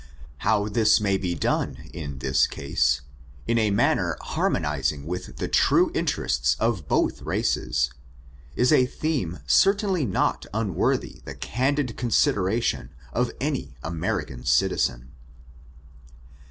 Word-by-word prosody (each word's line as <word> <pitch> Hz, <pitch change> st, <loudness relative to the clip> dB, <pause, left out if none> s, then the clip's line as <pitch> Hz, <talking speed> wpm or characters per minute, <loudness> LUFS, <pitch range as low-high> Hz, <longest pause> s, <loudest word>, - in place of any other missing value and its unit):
How 105 Hz, -2 st, +1 dB
this 110 Hz, +1 st, +4 dB
may 100 Hz, -2 st, +1 dB
be 90 Hz, -2 st, -2 dB
done 75 Hz, -, -2 dB
in 75 Hz, -5 st, -6 dB
this 65 Hz, -, +2 dB
case, 65 Hz, -1 st, 0 dB, 0.4 s
in 115 Hz, 0 st, +1 dB
a 110 Hz, -1 st, +2 dB
manner 100 Hz, -, +1 dB
harmonizing 75 Hz, -1 st, -1 dB
with 90 Hz, +3 st, -6 dB
the -, -, -2 dB
tnie -, -, +3 dB
interests 65 Hz, +3 st, 0 dB
of 110 Hz, -10 st, 0 dB
both -, -, +1 dB
races, 60 Hz, +1 st, 0 dB, 0.6 s
is 125 Hz, -, +3 dB
a 130 Hz, -4 st, +5 dB
theme 130 Hz, -, -2 dB
certainly 195 Hz, -, +3 dB
not 95 Hz, -, 0 dB
unworthy 105 Hz, -6 st, -1 dB
the -, -, -7 dB
candid 130 Hz, 0 st, -1 dB
consideration 105 Hz, -, +1 dB, 0.2 s
of 125 Hz, 0 st, +1 dB
any 135 Hz, -, -3 dB
American 80 Hz, -6 st, -3 dB
citizen. 65 Hz, -1 st, +1 dB
100 Hz, 115 wpm, -25 LUFS, -, 0.6 s, a